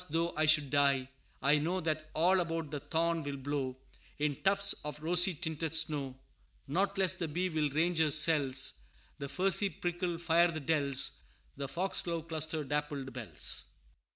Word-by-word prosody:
though 165 Hz, +2 st, -1 dB
I 155 Hz, +1 st, +2 dB
should 150 Hz, -3 st, +5 dB
die, 140 Hz, -2 st, +2 dB, 0.3 s
I 145 Hz, +2 st, +4 dB
know 175 Hz, +5 st, -1 dB
That 155 Hz, -2 st, -2 dB
all 180 Hz, +4 st, +3 dB
about 165 Hz, -3 st, -3 dB
the 145 Hz, -, -3 dB
thorn 165 Hz, +3 st, 0 dB
will 145 Hz, -2 st, -5 dB
blow 135 Hz, -1 st, -3 dB, 0.4 s
In 145 Hz, -2 st, -2 dB
tufts 200 Hz, 0 st, +3 dB
of 150 Hz, 0 st, -6 dB
rosy 175 Hz, +2 st, +4 dB
tinted 160 Hz, -1 st, -2 dB
snow. 145 Hz, -5 st, +2 dB, 0.5 s
"Not 195 Hz, +7 st, 0 dB
less 190 Hz, -2 st, +4 dB
the 175 Hz, -3 st, -4 dB
bee 180 Hz, +5 st, -1 dB
will 155 Hz, -3 st, 0 dB
range 165 Hz, +4 st, 0 dB
her 160 Hz, -1 st, +3 dB
cells, 140 Hz, -, +3 dB, 0.4 s
The 140 Hz, -, -4 dB
furzy 195 Hz, +4 st, +2 dB
prickle 175 Hz, -1 st, -3 dB
fire 170 Hz, +1 st, +3 dB
the 160 Hz, -1 st, -4 dB
dells, 140 Hz, -2 st, 0 dB, 0.4 s
The 140 Hz, 0 st, -4 dB
foxglove 170 Hz, 0 st, -2 dB
cluster 155 Hz, -1 st, -1 dB
dappled 145 Hz, -2 st, -3 dB
bells." 120 Hz, -3 st, -3 dB
155 Hz, 160 wpm, -32 LUFS, 145-170 Hz, 0.5 s, should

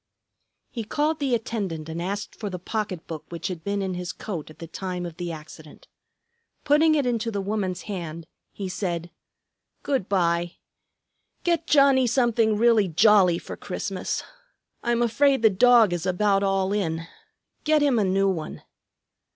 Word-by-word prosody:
He 230 Hz, -, -4 dB
called 300 Hz, +8 st, 0 dB
the 270 Hz, -4 st, +1 dB
attendant 200 Hz, -9 st, -4 dB
and 165 Hz, +1 st, -5 dB
asked 200 Hz, +3 st, -4 dB
for 210 Hz, -, -5 dB
the 185 Hz, -, -5 dB
pocket 185 Hz, -2 st, -4 dB
book 160 Hz, -2 st, -7 dB
which 170 Hz, +3 st, -4 dB
had 170 Hz, -3 st, -6 dB
been 200 Hz, 0 st, -1 dB
in 190 Hz, -1 st, -2 dB
his 180 Hz, +1 st, -4 dB
coat 175 Hz, -9 st, -6 dB
at 155 Hz, -, -14 dB
the 165 Hz, -, -8 dB
time 180 Hz, +1 st, -5 dB
of 170 Hz, -1 st, -8 dB
the 175 Hz, -1 st, -4 dB
accident. 155 Hz, -1 st, -11 dB, 0.8 s
Putting 310 Hz, +2 st, +4 dB
it 285 Hz, -3 st, +1 dB
into 235 Hz, -2 st, 0 dB
the 205 Hz, -3 st, -3 dB
woman's 195 Hz, -2 st, -2 dB
hand, 170 Hz, -5 st, -6 dB, 0.3 s
he 195 Hz, -, -5 dB
said, 175 Hz, -2 st, -3 dB, 0.7 s
"Good 265 Hz, -9 st, -1 dB
by. 175 Hz, -2 st, +1 dB, 0.9 s
Get 340 Hz, -2 st, 0 dB
Johnnie 275 Hz, -3 st, +5 dB
something 230 Hz, -3 st, +2 dB
really 225 Hz, -3 st, +4 dB
jolly 185 Hz, 0 st, +5 dB
for -, -, -8 dB
Christmas. -, -, -4 dB, 0.6 s
I'm 240 Hz, 0 st, +1 dB
afraid 265 Hz, +2 st, +2 dB
the 220 Hz, -, +6 dB
dog 225 Hz, 0 st, +5 dB
is 175 Hz, 0 st, -3 dB
about 195 Hz, +2 st, +2 dB
all 195 Hz, 0 st, +1 dB
in. 165 Hz, -5 st, -1 dB, 0.6 s
Get 305 Hz, -1 st, +3 dB
him 270 Hz, -5 st, +3 dB
a -, -, +3 dB
new 195 Hz, +1 st, +2 dB
one." 175 Hz, -5 st, -3 dB
200 Hz, 160 wpm, -25 LUFS, 175-235 Hz, 0.9 s, the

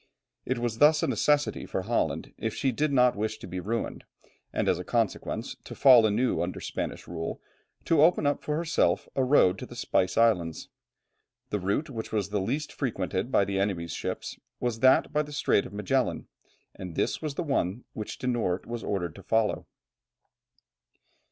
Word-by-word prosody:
It 130 Hz, -, 0 dB
was 120 Hz, -1 st, -2 dB
thus 150 Hz, +1 st, +5 dB
a -, -, +2 dB
necessity 145 Hz, 0 st, +1 dB
for -, -, -3 dB
Holland -, -, -1 dB
if 110 Hz, -1 st, -3 dB
she 135 Hz, -, +1 dB
did 150 Hz, +5 st, 0 dB
not 125 Hz, -2 st, +4 dB
wish 110 Hz, +1 st, -2 dB
to -, -, -10 dB
be 90 Hz, -, -5 dB
ruined, 110 Hz, +6 st, -3 dB, 0.5 s
and -, -, -1 dB
as -, -, +2 dB
a -, -, -4 dB
consequence, -, -, -2 dB
to -, -, -9 dB
fall 125 Hz, -5 st, +7 dB
anew 115 Hz, +5 st, +1 dB
under 85 Hz, +1 st, -3 dB
Spanish -, -, -5 dB
rule, 80 Hz, -1 st, -4 dB, 0.5 s
to 160 Hz, -3 st, +4 dB
open 160 Hz, -1 st, +4 dB
up 145 Hz, 0 st, +1 dB
for 150 Hz, -, -2 dB
herself 165 Hz, 0 st, +1 dB
a 135 Hz, -, +2 dB
road 115 Hz, -9 st, +4 dB
to -, -, -7 dB
the -, -, -11 dB
Spice 90 Hz, 0 st, 0 dB
Islands. 90 Hz, -9 st, +2 dB, 0.8 s
The 105 Hz, -, 0 dB
route 100 Hz, -, -1 dB
which 115 Hz, -3 st, -6 dB
was 105 Hz, -3 st, -1 dB
the 105 Hz, -1 st, -1 dB
least 140 Hz, +10 st, -2 dB
frequented 100 Hz, -, -2 dB
by 100 Hz, -, +4 dB
the 95 Hz, 0 st, -1 dB
enemy's 90 Hz, -5 st, -1 dB
ships -, -, -5 dB, 0.2 s
was 120 Hz, -2 st, -2 dB
that 130 Hz, +2 st, +4 dB
by 150 Hz, -, +3 dB
the 150 Hz, 0 st, -7 dB
Strait 135 Hz, -7 st, +1 dB
of -, -, -14 dB
Magellan, 115 Hz, +6 st, 0 dB, 0.5 s
and 90 Hz, -3 st, -8 dB
this -, -, 0 dB
was 150 Hz, -3 st, -4 dB
the 175 Hz, -, -2 dB
one 125 Hz, -, -1 dB
which 105 Hz, -, -6 dB
De -, -, -7 dB
Noort 110 Hz, -8 st, 0 dB
was 120 Hz, -1 st, -5 dB
ordered 90 Hz, -5 st, -2 dB
to 100 Hz, -, -12 dB
follow. 110 Hz, +3 st, 0 dB
115 Hz, 185 wpm, -28 LUFS, 95-135 Hz, 0.8 s, fall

